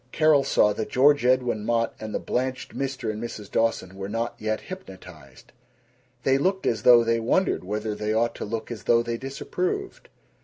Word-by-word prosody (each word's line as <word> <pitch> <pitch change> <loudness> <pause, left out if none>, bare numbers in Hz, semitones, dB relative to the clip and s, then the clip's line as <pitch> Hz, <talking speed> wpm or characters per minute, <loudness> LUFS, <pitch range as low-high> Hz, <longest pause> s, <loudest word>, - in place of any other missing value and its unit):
Carol 155 -3 +4
saw 105 -5 +3
that 110 +1 -4
George 145 +2 +4
Edwin 125 -4 +2
Mott 115 +1 0
and 110 0 -6
the - - -1
blanched 130 +1 -3
Mr. 135 -4 -3
and 110 +1 -6
Mrs. 110 -3 -7
Dawson 115 -5 0
were 95 0 -6
not 115 +2 -2
yet 110 0 -2
hypnotized. 90 - -12 0.7
They 135 0 +3
looked 190 +5 0
as 110 -3 0
though 120 +1 +7
they 115 0 +1
wondered 125 - +1
whether 105 +3 -3
they 105 +1 -3
ought 115 +2 +1
to - - -4
look 115 +2 -5
as 110 -5 -7
though 115 0 +4
they 115 0 -3
disapproved. 370 - -4
115 Hz, 185 wpm, -25 LUFS, 105-135 Hz, 0.7 s, though